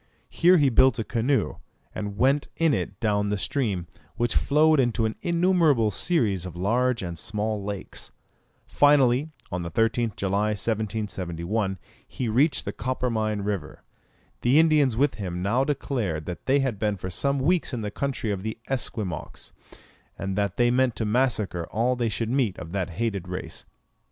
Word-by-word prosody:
Here 180 +2 +5
he 145 -4 +4
built 130 0 +4
a 115 - -1
canoe, 120 +2 0 0.4
and 105 -1 -5
went 135 +4 +2
in 165 -3 +3
it - - -3
down 105 -3 +1
the 105 - 0
stream, 100 -5 -1 0.3
which 120 -1 0
flowed 155 +1 +4
into 120 -3 +2
an 110 - -1
innumerable 170 - +3
series 105 - +1
of 90 - -9
large 115 +5 +1
and 85 -2 -5
small 105 0 -2
lakes. 100 -1 -6 0.5
Finally, 145 -1 +4 0.2
on 90 - -2
the 85 - -4
13th 115 - 0
July, 100 +2 0
1771, 100 -3 -2 0.3
he 125 - -4
reached 135 +8 +2
the - - -3
Coppermine 115 -5 -1
River. 100 -7 -4 0.6
The 125 +4 +4
Indians 150 -7 +4
with 145 +3 +3
him 90 -2 -4
now 120 +7 +2
declared 120 - -2
that 90 -1 -7
they 140 +1 +4
had 125 -7 -2
been 105 -1 0
for 95 0 -6
some 140 +10 0
weeks 165 +6 +1
in 120 -4 -3
the 105 -1 -4
country 135 -3 -2
of 100 -2 -3
the 110 +2 -4
Esquimaux, 110 - -4 0.7
and 95 0 -3
that 100 0 -1
they 120 0 +3
meant 130 -1 +2
to 110 - -2
massacre 105 -7 0
all 120 +4 +1
they 120 -2 0
should 110 +3 -2
meet 125 -8 +1
of 85 - -8
that 95 -1 -2
hated 100 -1 -3
race. 90 -3 -6
110 Hz, 165 wpm, -25 LUFS, 100-130 Hz, 0.7 s, Here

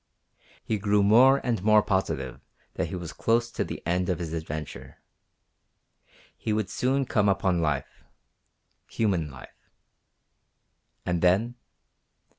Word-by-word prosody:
He 110 -2 -2
grew 105 0 +2
more 125 +7 +6
and 115 -6 0
more 105 +1 +5
positive 95 - -2 0.3
that - - -2
he 80 - -5
was 85 -2 -6
close 115 +1 +1
to - - -2
the - - -7
end 90 +1 0
of 90 - 0
his 85 -1 -5
adventure. 80 -2 -6 1.4
He 110 - -4
would 105 -2 -1
soon 130 +4 0
come 105 -4 +2
upon 95 -3 +1
life 75 -4 -3 0.9
human 95 -9 0
life. 65 -1 -15 1.4
And 90 -1 -1
then? 100 +7 +3
95 Hz, 125 wpm, -26 LUFS, 85-110 Hz, 1.4 s, more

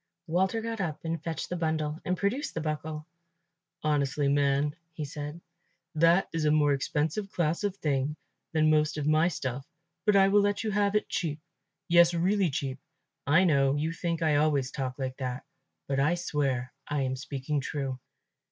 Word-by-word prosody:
Walter 190 +6 +1
got 225 -2 -3
up 160 -3 -4
and 165 -1 -3
fetched 165 -1 -4
the 180 - -2
bundle 155 -2 -1
and 180 0 -1
produced 215 - -1
the - - -1
buckle. 155 0 -4 0.8
"Honestly, 145 -2 +1
man," 140 +1 +2 0.2
he 155 -2 -4
said, 150 +2 -6 0.5
"that 165 +4 +4
is 165 -1 -1
a - - +4
more 150 -1 +4
expensive 155 +8 -1
class 170 +2 0
of 200 -2 0
thing 145 -3 0 0.4
than 155 -1 +3
most 155 0 +2
of 150 - -2
my 155 +2 +4
stuff; 135 -5 -3 0.4
but 210 - +5
I 195 -1 +6
will 205 +1 +5
let 205 +1 0
you 215 - -1
have 205 0 +1
it 210 - +1
cheap. 155 -4 -2 0.5
Yes, 170 0 +6
really 185 +2 +2
cheap; 135 -1 -3 0.5
I 155 +6 +5
know 140 -5 +3
you 155 +3 -1
think 165 0 -2
I 155 -2 +3
always 145 -3 +2
talk 130 -3 -4
like 130 -2 -4
that, 130 -2 -4 0.4
but 135 -1 0
I 150 +5 +3
swear 135 -7 -1
I 145 -1 0
am 130 0 -1
speaking 140 +2 -3
true." 135 -2 -3
155 Hz, 180 wpm, -29 LUFS, 140-175 Hz, 0.8 s, I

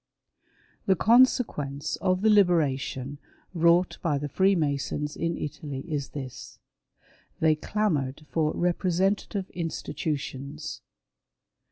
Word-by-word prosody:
The 190 - +5
consequence 200 - +3
of 185 +1 0
the 220 - +5
" - - +6
liberation 145 -8 +2 0.2
" - - -36
wrought 170 +1 +3
by 150 -4 +1
the 145 +1 -3
Freemasons 150 -5 +1
in 165 0 -2
Italy 145 -2 -5
is 145 -4 -3
this: 135 -4 -8 0.8
They 160 -1 +4
clamoured 155 -6 -1
for 155 -1 0
representative 185 +2 0
institutions. 150 -3 -4
155 Hz, 100 wpm, -27 LUFS, 145-185 Hz, 0.8 s, "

